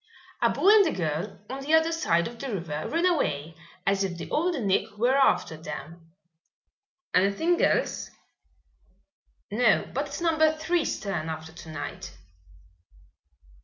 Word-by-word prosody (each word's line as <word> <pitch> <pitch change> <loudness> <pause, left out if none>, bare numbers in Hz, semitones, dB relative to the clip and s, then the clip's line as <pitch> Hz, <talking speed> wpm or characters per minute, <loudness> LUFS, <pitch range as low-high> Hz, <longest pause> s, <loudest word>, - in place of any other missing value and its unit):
"A - - +4
boy 390 - +3
and 415 -3 +7
a - - 0
girl 170 +3 -3
on 265 +2 -6
the 300 +4 +3
other 320 +1 +3
side 170 - +1
of 235 0 -10
the 275 -2 -4
river 160 -6 -4
ran 335 +2 +1
away 165 - 0 0.3
as 195 0 +2
if 180 -3 -3
the - - -8
Old 335 0 +1
Nick 205 0 0
were 245 +5 +3
after 270 -11 +3
them." 165 +2 -9 1.0
"Anything 200 - +2
else?" - - +1 1.4
"No, 220 0 +3
but 280 +3 -1
it's 280 - -6
Number 315 -2 +2
Three's 330 +1 0
turn 175 -6 -3
after 160 0 -6
tonight." 155 - -8
210 Hz, 140 wpm, -27 LUFS, -, 1.4 s, and